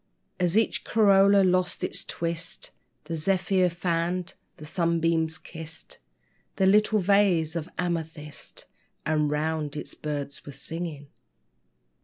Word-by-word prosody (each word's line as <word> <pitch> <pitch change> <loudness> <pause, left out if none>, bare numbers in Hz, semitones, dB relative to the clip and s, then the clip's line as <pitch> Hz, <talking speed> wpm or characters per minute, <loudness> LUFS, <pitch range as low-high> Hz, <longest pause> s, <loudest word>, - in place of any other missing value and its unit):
As 180 +2 +2
each 225 - +2
corolla 200 -2 +5
lost 185 -1 +1
its - - -2
twist, 170 0 -3 0.3
The 165 +2 -4
zephyr 185 +2 +2
fanned, 175 +1 -1 0.2
the 150 - -10
sunbeam 165 0 +1 0.2
kissed 160 -1 -8 0.6
The 190 - +2
little 210 +2 +5
vase 185 -5 +3
of 165 +1 -3
amethyst; 160 -5 -4 0.4
And 150 -1 +2
round 150 0 -1
it - - -6
birds 145 -2 -4
were 145 - -9
singing. 150 0 -5
170 Hz, 115 wpm, -27 LUFS, 155-185 Hz, 0.6 s, corolla